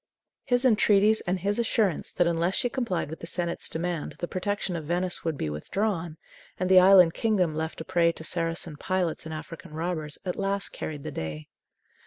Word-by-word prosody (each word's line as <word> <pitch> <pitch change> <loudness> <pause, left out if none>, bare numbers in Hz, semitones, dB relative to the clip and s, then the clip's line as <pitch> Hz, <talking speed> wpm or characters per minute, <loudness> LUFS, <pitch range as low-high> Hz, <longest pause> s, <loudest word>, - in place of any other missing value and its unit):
His 245 -1 +2
entreaties 215 -2 +5
and 180 +1 0
his 205 +4 +1
assurance 215 -6 +1
that, 175 - +2
unless 170 +2 +1
she 245 - 0
complied 230 - -2
with 160 - -7
the 165 - -7
senate's 175 -1 -2
demand, 170 -1 -3
the 175 - -5
protection 190 0 -2
of 160 -3 -5
Venice 175 +3 -1
would 160 -3 -2
be 80 - -2
withdrawn, 165 - -2 0.4
and 185 +1 0
the 185 - +9
island 185 -3 +7
kingdom 190 -8 +1
left 160 +1 -4
a - - -7
prey 170 -2 +3
to 160 - -9
Saracen 165 -1 -2
pirates 180 -2 -1
and 160 - -6
African 155 0 -9
robbers, 160 -2 -3
at 180 - -2
last 195 0 -1
carried 150 -3 -6
the - - -5
day. 80 -1 -6
175 Hz, 190 wpm, -27 LUFS, 160-195 Hz, 0.4 s, the